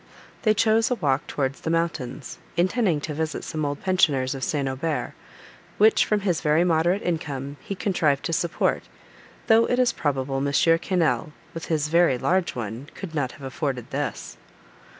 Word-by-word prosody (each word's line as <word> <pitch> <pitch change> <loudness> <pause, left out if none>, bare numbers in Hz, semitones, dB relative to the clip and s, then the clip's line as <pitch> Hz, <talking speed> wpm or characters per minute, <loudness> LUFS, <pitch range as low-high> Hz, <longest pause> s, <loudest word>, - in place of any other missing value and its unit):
They 215 -3 +3
chose 220 +1 +3
a 250 - +1
walk 140 - 0
towards 135 -1 -2
the - - -3
mountains, 155 -6 -2 0.2
intending 185 -3 +2
to 150 - -4
visit 155 0 -3
some 155 -1 -4
old 145 -1 -3
pensioners 145 -9 +2
of 135 -1 -6
St. 145 -5 -1
Aubert, 145 +4 -2 0.6
which, 215 +1 +5
from 210 -1 +1
his 180 -5 0
very 155 +3 +3
moderate 175 +3 +2
income, 145 -5 -3
he 200 - -5
contrived 155 -8 +1
to 165 - -1
support, 170 +1 0 0.6
though 225 +1 +5
it 245 - +1
is 250 -1 +3
probable 135 -3 -1
M. 140 +1 0
Quesnel, 165 -3 +2 0.2
with 165 - -6
his 150 -2 0
very 170 -5 +4
large 180 +5 0
one, 120 +4 -5
could 185 -5 -7
not 140 -5 -1
have 140 - -14
afforded 135 -2 -4
this. - - -4
160 Hz, 170 wpm, -24 LUFS, 140-180 Hz, 0.6 s, which